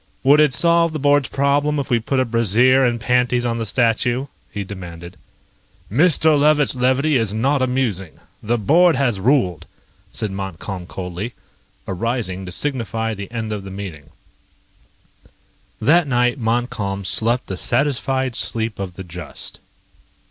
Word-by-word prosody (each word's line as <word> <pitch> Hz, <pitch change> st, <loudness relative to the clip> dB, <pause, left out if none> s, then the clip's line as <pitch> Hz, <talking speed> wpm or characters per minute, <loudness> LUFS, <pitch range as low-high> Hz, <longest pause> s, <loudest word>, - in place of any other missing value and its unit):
"Would 140 Hz, +3 st, +6 dB
it 150 Hz, -2 st, +5 dB
solve 170 Hz, +4 st, +2 dB
the 155 Hz, -, -3 dB
board's 145 Hz, -1 st, +3 dB
problem 145 Hz, +2 st, +1 dB
if 140 Hz, -1 st, -3 dB
we 120 Hz, -, +3 dB
put 130 Hz, +4 st, -1 dB
a 130 Hz, -, +2 dB
brassiere 120 Hz, +3 st, +3 dB
and 120 Hz, -2 st, +1 dB
panties 125 Hz, 0 st, +1 dB
on 115 Hz, -1 st, -1 dB
the 115 Hz, -, -3 dB
statue?" 120 Hz, +3 st, +1 dB, 0.3 s
he 100 Hz, -, -4 dB
demanded. 90 Hz, -2 st, -9 dB, 0.8 s
"Mr. 155 Hz, -, +4 dB
Levitt's 150 Hz, 0 st, +3 dB
levity 130 Hz, +3 st, +2 dB
is 110 Hz, -3 st, -1 dB
not 135 Hz, +5 st, +1 dB
amusing. 125 Hz, -9 st, -1 dB, 0.3 s
The 120 Hz, +3 st, 0 dB
board 165 Hz, -, +4 dB
has 125 Hz, -7 st, 0 dB
ruled," 100 Hz, -, +1 dB, 0.4 s
said 110 Hz, -3 st, -4 dB
Montcalm 95 Hz, -1 st, -6 dB
coldly, 90 Hz, +6 st, -6 dB, 0.5 s
arising 95 Hz, -2 st, -3 dB
to -, -, -6 dB
signify 115 Hz, -2 st, -1 dB
the 100 Hz, -1 st, -7 dB
end 115 Hz, -2 st, -4 dB
of 105 Hz, -2 st, -5 dB
the 95 Hz, -, -8 dB
meeting. 90 Hz, -7 st, -8 dB, 1.7 s
That 165 Hz, +2 st, +3 dB
night 125 Hz, 0 st, +1 dB
Montcalm 115 Hz, -4 st, -2 dB
slept 120 Hz, +6 st, +2 dB
the 95 Hz, -, -5 dB
satisfied 130 Hz, +2 st, 0 dB
sleep 110 Hz, -3 st, -2 dB
of 95 Hz, -3 st, -5 dB
the 95 Hz, -, -7 dB
just. 85 Hz, -3 st, -8 dB
120 Hz, 145 wpm, -20 LUFS, 100-135 Hz, 1.7 s, Would